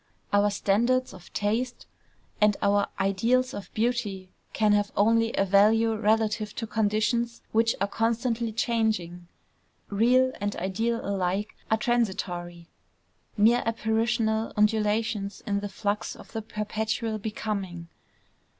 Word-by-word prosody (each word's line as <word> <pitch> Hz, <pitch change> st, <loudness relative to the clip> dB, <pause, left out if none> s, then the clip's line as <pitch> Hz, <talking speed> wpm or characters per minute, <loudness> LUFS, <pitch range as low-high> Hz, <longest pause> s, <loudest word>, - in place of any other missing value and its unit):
Our 205 Hz, 0 st, +4 dB
standards 235 Hz, +6 st, +1 dB
of 180 Hz, -2 st, -14 dB
taste 230 Hz, +5 st, -2 dB, 0.6 s
and 210 Hz, -1 st, +4 dB
our 200 Hz, 0 st, +3 dB
ideals 230 Hz, +7 st, +1 dB
of 205 Hz, -, -8 dB
beauty 215 Hz, -5 st, -1 dB, 0.2 s
can 215 Hz, -1 st, +2 dB
have 205 Hz, 0 st, +1 dB
only 225 Hz, +2 st, +3 dB
a 195 Hz, -, +2 dB
value 215 Hz, +4 st, +4 dB
relative 215 Hz, 0 st, 0 dB
to 230 Hz, -, -3 dB
conditions 220 Hz, +2 st, 0 dB
which 225 Hz, +1 st, +2 dB
are 200 Hz, -, +2 dB
constantly 230 Hz, +1 st, -1 dB
changing. 215 Hz, -7 st, -1 dB, 0.6 s
Real 250 Hz, +5 st, +3 dB
and 205 Hz, 0 st, -1 dB
ideal 225 Hz, +6 st, -2 dB
alike 195 Hz, +1 st, -1 dB
are 220 Hz, -, +3 dB
transitory, 180 Hz, -8 st, -2 dB, 0.7 s
mere 230 Hz, +4 st, +5 dB
apparitional 225 Hz, 0 st, 0 dB
undulations 210 Hz, -1 st, +1 dB
in 200 Hz, -1 st, 0 dB
the 205 Hz, 0 st, -5 dB
flux 205 Hz, +1 st, -2 dB
of -, -, -14 dB
the 225 Hz, -, -4 dB
perpetual 215 Hz, +1 st, -3 dB
Becoming. 200 Hz, -5 st, -4 dB
215 Hz, 120 wpm, -27 LUFS, 200-230 Hz, 0.7 s, mere